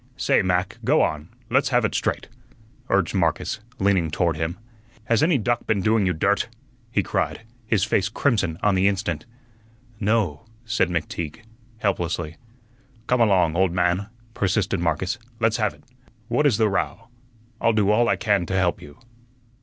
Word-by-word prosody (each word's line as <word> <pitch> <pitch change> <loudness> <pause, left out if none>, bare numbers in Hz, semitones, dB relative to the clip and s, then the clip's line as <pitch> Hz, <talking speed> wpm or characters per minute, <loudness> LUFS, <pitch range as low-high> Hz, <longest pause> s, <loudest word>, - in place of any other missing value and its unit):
"Say, - - +3
Mac, 90 0 -1
go - - +4
on; 75 +1 -2 0.2
let's - - +3
have - - +3
ut - - -1
straight," - - -1 0.6
urged - - +2
Marcus, - - 0 0.2
leaning 95 -4 +2
toward 85 +1 0
him. 80 +3 -3 0.5
"Has 115 +1 +2
any 160 -1 +4
duck 120 0 -1
been 105 -3 +1
doing 105 0 +2
you 90 - +1
dirt?" 100 +8 +1 0.4
he 100 -3 +1
cried, - - -1 0.3
his 110 -5 +2
face 100 -3 +1
crimson 105 - 0
on 105 - +4
the 95 +1 +3
instant. 95 -1 -2 0.7
"No," 105 -5 0 0.2
said 110 -5 +1
McTeague, 85 +3 -4 0.3
helplessly. 85 -6 -2 0.7
"Come 125 0 +2
along, 95 -7 +3
old 95 -1 +2
man," 90 +2 +1 0.3
persisted 100 -1 0
Marcus; 85 +6 -1 0.2
"let's 115 -1 +2
have 105 -3 0
ut. - - -23 0.5
What 145 +5 +3
is 125 - +2
the 110 -1 +3
row? 115 +3 -2 0.5
I'll 115 - +4
do 105 -2 +3
all 120 +3 +3
I - - +3
can 100 -6 +1
to 95 - -2
help 95 -2 +1
you." 75 0 -13
100 Hz, 160 wpm, -23 LUFS, 85-110 Hz, 0.7 s, go